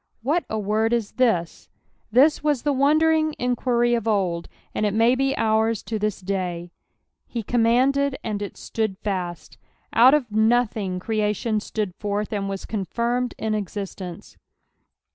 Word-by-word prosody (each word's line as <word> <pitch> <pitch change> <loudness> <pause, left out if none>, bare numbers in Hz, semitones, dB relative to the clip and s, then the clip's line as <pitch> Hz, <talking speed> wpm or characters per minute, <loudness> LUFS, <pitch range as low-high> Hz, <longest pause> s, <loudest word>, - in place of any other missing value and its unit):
"What 300 +4 +1
a 220 - -2
word 215 +2 +1
is 230 -3 -1
this)" 220 -10 0 0.4
This 285 +7 +4
was 295 -5 +1
the 290 - +1
wondering 310 +3 +3
enijuiry 240 -1 +1
of 230 -1 -3
old, 185 -6 0 0.3
and - - -1
it 205 -1 +1
may 230 +2 +4
be 270 +1 0
ours 220 -1 +1
to 220 -2 -3
this 210 -1 -2
day. 180 -2 -3 0.3
" - - -53
He 235 -2 -4
eammandtd, 255 +5 +2
and 210 -2 -3
it 205 - -6
flood 220 -3 -2
fait.'" 180 -5 -4 0.4
Out 255 +5 +7
of 255 -7 -1
nothing 220 -4 +1
creation 215 +1 0
stood 210 -3 -3
forth, 205 +2 -3
and 195 -1 -2
was 195 -1 -5
contlrmcd 235 +5 -1
in 220 -1 -2
existence. 195 -3 -6
220 Hz, 150 wpm, -23 LUFS, 200-245 Hz, 0.4 s, Out